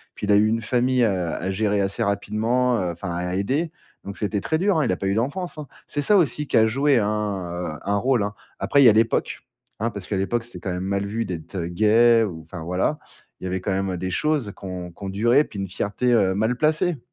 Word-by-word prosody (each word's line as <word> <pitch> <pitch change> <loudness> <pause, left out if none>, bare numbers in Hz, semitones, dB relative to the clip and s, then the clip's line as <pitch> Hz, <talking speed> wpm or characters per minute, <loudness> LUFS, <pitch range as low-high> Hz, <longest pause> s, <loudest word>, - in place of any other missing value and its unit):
puis, 105 - -5
il - - +3
a - - +6
eu 105 +1 +5
une 115 +1 0
famille, 125 +2 +1
heu, - - +5 0.2
à 90 +3 -3
gérer 105 +1 0
assez 100 +4 -1
rapidement, 115 +4 +1
heu, 90 -4 -1
enfin, 85 +2 -6
à 90 +1 -3
aider. 140 - -1 0.3
Donc, 100 - -7
c'était 105 -1 -1
très 160 - 0
dur, 190 +1 +2
hein. 150 - +2
Il - - +1
a 90 - 0
pas 95 - -3
eu 100 - +1
d'enfance, 155 - -2
hein. 150 - -6 0.2
C'est 145 - -2
ça 205 +8 +4
aussi 150 -4 +1
qui - - +1
a 110 0 +5
joué 135 +2 +3
un, 95 -6 -2
heu, - - -16
un 100 - 0
rôle, 125 0 +2
hein. 105 - -3 0.3
Après, 110 +9 +3
il - - +6
y - - +10
a - - +7
l'époque, 110 +1 +1 0.4
hein, 115 +2 0
parce 100 -4 -8
qu'à 100 - -1
l'époque, 115 +5 -1
c'était 120 - -10
quand 95 - -4
même 90 +1 -3
mal 100 +1 -1
vu 110 +3 -2
d'être, 85 0 -7
heu, 85 -3 -2
gay 115 +5 +4
ou 85 -6 -6
enfin, 80 +2 -9
voilà. 90 - -1 0.4
Il - - -8
y - - -1
avait 95 0 -2
quand 95 - -2
même 95 -1 -1
des 95 +1 -3
choses 150 - 0
qui - - -11
ont 90 -2 -6
qui 85 - -22
ont 95 - -3
duré, 120 +9 +3
puis 100 - -8
une 95 - -3
fierté, 105 +7 -1
heu, 95 -5 +3
mal 110 +4 0
placée. 155 +1 +1
105 Hz, 265 wpm, -23 LUFS, 95-125 Hz, 0.4 s, y